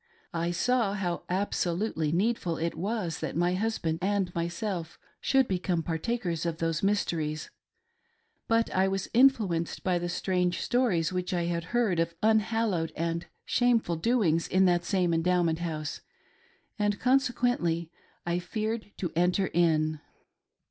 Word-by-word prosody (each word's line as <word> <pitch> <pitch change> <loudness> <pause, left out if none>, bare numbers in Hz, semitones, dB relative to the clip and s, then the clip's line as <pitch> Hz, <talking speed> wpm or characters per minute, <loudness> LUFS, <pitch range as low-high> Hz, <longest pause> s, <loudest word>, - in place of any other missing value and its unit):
I 170 0 -1
saw 210 +3 +1
how 180 -3 -2
absolutely 180 -3 -1
needful 180 -2 0
it 165 +1 -1
was 190 -4 -2
that - - -4
my 175 +2 +2
husband 185 -5 -1
and 195 -2 0
myself 170 0 -3 0.2
should 265 -2 +3
become 180 -2 -1
partakers 170 0 -2
of 170 -2 -2
those 165 -1 -1
mys 205 +1 +2
teries; 155 -2 -3 1.0
but 230 0 +2
I 190 +1 +3
was 195 0 -2
influenced 220 -10 +3
by 180 -2 +1
the 175 0 -3
strange 180 -1 0
stories 210 -10 +1
which 180 0 -2
I 175 - 0
had 170 -1 -2
heard 220 -4 +1
of 165 0 0
unhallowed 220 -5 +2
and 165 +1 -2 0.2
shameful 235 -8 +2
doings 170 -4 +2
in 190 +1 +3
that 175 -1 +2
same 180 -3 +1
Endowment 170 -1 +2
House, 155 -3 -4 0.8
and 205 -1 +1
consequently 245 -10 +1 0.3
I 175 0 0
feared 215 +3 -3
to 175 - -3
enter 180 +3 +2
in. 155 -2 +2
180 Hz, 140 wpm, -28 LUFS, 170-215 Hz, 1.0 s, should